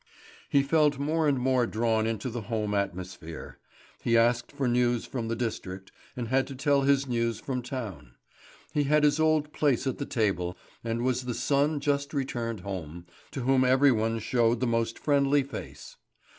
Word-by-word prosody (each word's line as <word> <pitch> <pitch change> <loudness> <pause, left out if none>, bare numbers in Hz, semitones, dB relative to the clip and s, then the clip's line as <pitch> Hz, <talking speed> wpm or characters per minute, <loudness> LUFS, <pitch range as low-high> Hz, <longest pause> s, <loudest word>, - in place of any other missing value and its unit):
He 140 -1 +4
felt 150 0 +3
more 155 +3 0
and 140 -2 +2
more 125 -1 +2
drawn 110 0 +1
into 115 +2 -3
the 120 0 -4
home 105 -1 -2
atmosphere. 90 -4 -5 0.4
He 115 0 +3
asked 120 +1 +2
for 140 -2 -2
news 120 -1 +1
from 120 -4 -4
the 115 - -1
district, 95 -5 -5 0.3
and 120 -2 -3
had 130 +1 +2
to 135 - -7
tell 140 +1 +2
his 140 0 +2
news 115 -2 -1
from 125 0 -3
town. 105 - -7 0.6
He 145 -1 +1
had 150 +2 +3
his 145 +1 +3
old 155 -1 +2
place 140 -4 +1
at 130 - -2
table, 90 -6 0 0.3
and 115 +1 -2
was 125 0 0
the 125 -2 -3
son 145 +2 +1
just 140 +1 -1
returned 120 -6 -2
home, 90 -3 -6 0.2
to 135 - -5
whom 130 +1 +3
every 130 +2 +5
one 115 0 0
showed 115 +1 +1
the 130 - 0
most 115 -1 0
friendly 140 -1 +2
face. 135 - -9
125 Hz, 175 wpm, -28 LUFS, 115-140 Hz, 0.6 s, every